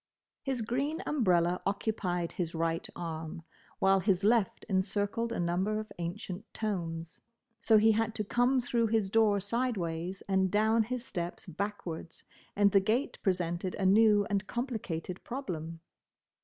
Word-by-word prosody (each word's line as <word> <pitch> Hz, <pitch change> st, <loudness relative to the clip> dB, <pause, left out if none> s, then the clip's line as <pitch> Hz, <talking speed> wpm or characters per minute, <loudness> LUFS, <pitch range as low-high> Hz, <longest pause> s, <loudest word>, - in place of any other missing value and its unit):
His 265 Hz, -5 st, -2 dB
green 280 Hz, -, -1 dB
umbrella 180 Hz, -, +2 dB
occupied 195 Hz, -4 st, -1 dB
his 170 Hz, -2 st, -3 dB
right 165 Hz, 0 st, -1 dB
arm, 165 Hz, -1 st, -5 dB, 0.3 s
while 195 Hz, 0 st, +4 dB
his 190 Hz, -1 st, +1 dB
left 220 Hz, -1 st, +2 dB
encircled 205 Hz, +3 st, 0 dB
a -, -, -2 dB
number 185 Hz, +5 st, 0 dB
of 215 Hz, 0 st, -7 dB
ancient 180 Hz, +2 st, -5 dB
tomes; 170 Hz, -6 st, -3 dB, 0.4 s
so 220 Hz, -, +5 dB
he 220 Hz, +1 st, +6 dB
had 225 Hz, +1 st, 0 dB
to 215 Hz, -, -1 dB
come 245 Hz, +5 st, +2 dB
through 235 Hz, -1 st, +1 dB
his 215 Hz, -3 st, +1 dB
door 215 Hz, -2 st, +4 dB
sideways 195 Hz, -5 st, -2 dB
and 190 Hz, -1 st, +2 dB
down 220 Hz, +3 st, +3 dB
his 245 Hz, +2 st, -3 dB
steps 175 Hz, -5 st, -5 dB
backwards, 180 Hz, -3 st, -5 dB, 0.3 s
and 205 Hz, 0 st, +4 dB
the 195 Hz, -, +6 dB
gate 225 Hz, +9 st, 0 dB
presented 180 Hz, -1 st, -1 dB
a 195 Hz, -, -1 dB
new 205 Hz, +1 st, +5 dB
and 200 Hz, -1 st, -1 dB
complicated 200 Hz, -9 st, -4 dB
problem. 165 Hz, -, -5 dB
200 Hz, 140 wpm, -31 LUFS, 175-225 Hz, 0.4 s, he